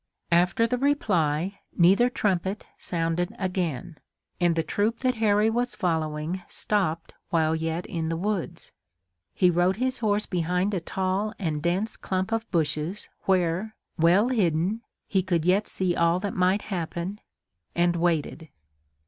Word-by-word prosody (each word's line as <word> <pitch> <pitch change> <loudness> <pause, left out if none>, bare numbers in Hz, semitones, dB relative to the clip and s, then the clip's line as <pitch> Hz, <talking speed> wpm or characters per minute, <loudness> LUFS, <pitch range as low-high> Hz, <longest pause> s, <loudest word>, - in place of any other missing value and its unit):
After 180 +6 +3
the 250 +1 -1
reply 195 - +1 0.2
neither 195 +8 +5
trumpet 195 -3 -1
sounded 170 0 -2
again, 175 -5 -3 0.4
and 175 -2 +3
the 165 - +1
troop 210 +8 0
that 255 -1 +2
Harry 210 0 +4
was 240 +2 0
following 160 0 -1
stopped 170 -6 0 0.2
while 160 -1 +2
yet 160 +2 -2
in 160 -2 -3
the 165 - -1
woods. 180 -2 -3 0.6
He 180 -1 +4
rode 175 +2 +2
his 255 +2 -1
horse 210 -2 +1
behind 180 +3 0
a 190 - 0
tall 190 +5 -2
and 155 -6 -2
dense 185 +7 -1
clump 190 +2 -2
of 225 0 -1
bushes, 160 +3 -1 0.2
where, 185 +3 +1 0.2
well 185 +7 +4
hidden, 190 -2 +1 0.2
he 195 - +1
could 175 -3 0
yet 195 +4 +3
see 180 -2 -1
all 170 +1 +3
that 200 -1 -3
might 185 +2 +2
happen, 175 +3 -4 0.5
and 175 0 +2
waited. 165 -2 -1
180 Hz, 140 wpm, -26 LUFS, 165-205 Hz, 0.6 s, neither